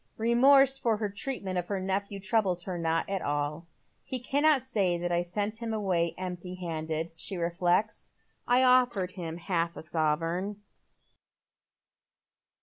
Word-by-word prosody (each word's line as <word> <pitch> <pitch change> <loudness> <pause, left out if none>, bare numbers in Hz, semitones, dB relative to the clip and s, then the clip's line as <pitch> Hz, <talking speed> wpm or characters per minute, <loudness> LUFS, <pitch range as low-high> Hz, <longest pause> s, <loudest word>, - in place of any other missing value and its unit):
Eemorse 270 +4 +5
for 230 -4 +1
her 210 -1 -2
treatment 200 -4 -3
of 175 - -5
her 200 -2 -2
nephew 195 +1 -2
troubles 190 -3 +1
her 185 -1 -4
not 165 -1 0
at 195 -1 -2
all. 145 +3 -2 0.4
"He 260 - -3
cannot 285 +2 +2
say 200 -9 0
that 175 0 -3
I 175 0 +2
sent 205 +5 -3
him 230 -1 -3
away 180 -6 0
empty 180 0 -5
handed," 160 -2 -3
she 185 +4 -5
reflects. 175 +4 0 0.2
" - - -27
I 245 +1 +4
ofiered 245 -7 +3
him 170 -4 -6
half 170 -1 -1
a - - -7
sovereign." 165 +5 -1
185 Hz, 145 wpm, -29 LUFS, 170-220 Hz, 0.4 s, Eemorse